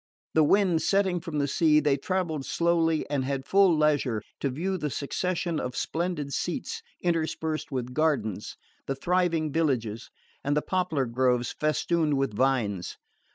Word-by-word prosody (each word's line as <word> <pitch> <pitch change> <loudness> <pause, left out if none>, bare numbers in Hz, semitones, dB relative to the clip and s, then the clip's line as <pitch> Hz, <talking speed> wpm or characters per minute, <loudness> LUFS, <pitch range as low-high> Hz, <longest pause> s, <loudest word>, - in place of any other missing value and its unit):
The 160 - +5
wind 180 0 +3
setting 195 -3 +2
from 165 -3 -5
the 140 -1 +1
sea, 150 +1 +4
they 145 -2 +2
travelled 160 -1 -2
slowly 165 0 +1
and 140 -2 -1
had 135 0 -3
full 190 -2 +4
leisure 145 -8 +1 0.2
to 140 - 0
view 180 +8 -2
the 150 - -2
succession 170 +5 -2
of 125 0 -4
splendid 160 -4 -2
seats 260 - -3 0.2
interspersed 160 -2 -1
with 125 -2 -3
gardens, 135 - -1 0.3
the 135 - -1
thriving 170 0 +1
villages, 125 -9 -1 0.3
and 145 +1 +1
the 150 - +1
poplar 180 -7 0
groves 125 0 +1
festooned 155 0 +1
with 135 -5 0
vines. 115 -8 0
155 Hz, 150 wpm, -27 LUFS, 135-170 Hz, 0.3 s, The